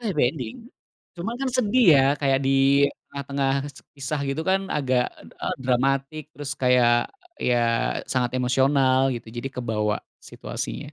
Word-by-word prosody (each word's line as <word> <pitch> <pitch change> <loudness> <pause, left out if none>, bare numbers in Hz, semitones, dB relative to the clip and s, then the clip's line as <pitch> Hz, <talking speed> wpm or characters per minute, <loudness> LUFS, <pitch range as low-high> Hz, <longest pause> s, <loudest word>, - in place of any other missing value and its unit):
Happy 205 -10 -1
ending, 125 -8 -6 0.6
cuma 225 +8 -4
kan 270 - 0
sedih 250 0 +2
ya 135 - +4 0.2
kayak 135 -2 +2
di - - +2 0.6
tengah-tengah 140 -1 -2 0.2
kese 145 -1 -12
kisah 140 +2 -3
gitu 135 +3 -2
kan 190 0 +3 0.2
agak 130 -3 +1 0.4
eee, - - -1
dramatik 135 +4 0
terus 145 -2 -7
kayak, 125 -2 +4 0.5
iya 125 - +2 0.6
sangat 125 -2 +1
emosional 130 +1 +3
gitu 115 -1 -8
jadi 120 +3 -3
kebawa, 110 -4 -1 0.3
situasinya. - - -5
135 Hz, 135 wpm, -24 LUFS, 125-145 Hz, 0.6 s, ya